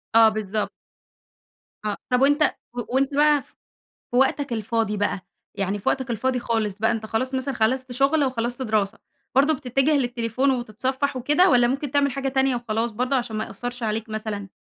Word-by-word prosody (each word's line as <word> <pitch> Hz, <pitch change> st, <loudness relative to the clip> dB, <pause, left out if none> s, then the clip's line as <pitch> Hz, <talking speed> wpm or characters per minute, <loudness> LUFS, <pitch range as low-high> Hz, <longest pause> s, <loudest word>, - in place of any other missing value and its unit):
آه، 225 Hz, -1 st, +8 dB
بالضبط. 215 Hz, -1 st, -2 dB, 1.2 s
آه، 210 Hz, -, -1 dB
طب 250 Hz, +1 st, +2 dB
وأنت 290 Hz, +2 st, +4 dB, 0.3 s
و 245 Hz, -, -5 dB, 0.2 s
وأنت 275 Hz, +1 st, +2 dB
بقى 295 Hz, 0 st, +4 dB
ف 285 Hz, -, -22 dB, 0.6 s
في 245 Hz, -, -2 dB
وقتك 270 Hz, 0 st, +2 dB
الفاضي 220 Hz, -1 st, -1 dB
بقى 200 Hz, -1 st, -1 dB, 0.3 s
يعني 195 Hz, +1 st, -1 dB
في 195 Hz, -, -2 dB
وقتك 260 Hz, -2 st, -1 dB
الفاضي 250 Hz, +3 st, 0 dB
خالص 220 Hz, -4 st, -1 dB
بقى، 220 Hz, -, +2 dB
أنت 220 Hz, -2 st, -2 dB
خلاص 255 Hz, +5 st, -2 dB
مثلًا 260 Hz, 0 st, -1 dB
خلصت 255 Hz, +3 st, 0 dB
شُغل 275 Hz, +4 st, +3 dB
وخلصت 245 Hz, 0 st, -2 dB
دراسة، 215 Hz, -2 st, 0 dB, 0.4 s
برضه 285 Hz, +4 st, +4 dB
بتتجه 270 Hz, +3 st, +1 dB
للتليفون 245 Hz, +1 st, 0 dB
وتتْصفّح 260 Hz, +3 st, -1 dB
وكده 295 Hz, +8 st, +3 dB
والّا 245 Hz, -1 st, +5 dB
ممكن 275 Hz, +2 st, -2 dB
تعمل 285 Hz, -1 st, +2 dB
حاجة 275 Hz, 0 st, -2 dB
تانية 265 Hz, -1 st, +2 dB
وخلاص، 230 Hz, 0 st, -1 dB
برضه 250 Hz, +5 st, 0 dB
عشان 230 Hz, -3 st, -2 dB
ما 215 Hz, -, -1 dB
يأثرش 245 Hz, +3 st, -6 dB
عليك 220 Hz, +1 st, -2 dB
مثلًا؟ 215 Hz, -2 st, -4 dB
245 Hz, 175 wpm, -24 LUFS, 220-270 Hz, 1.2 s, آه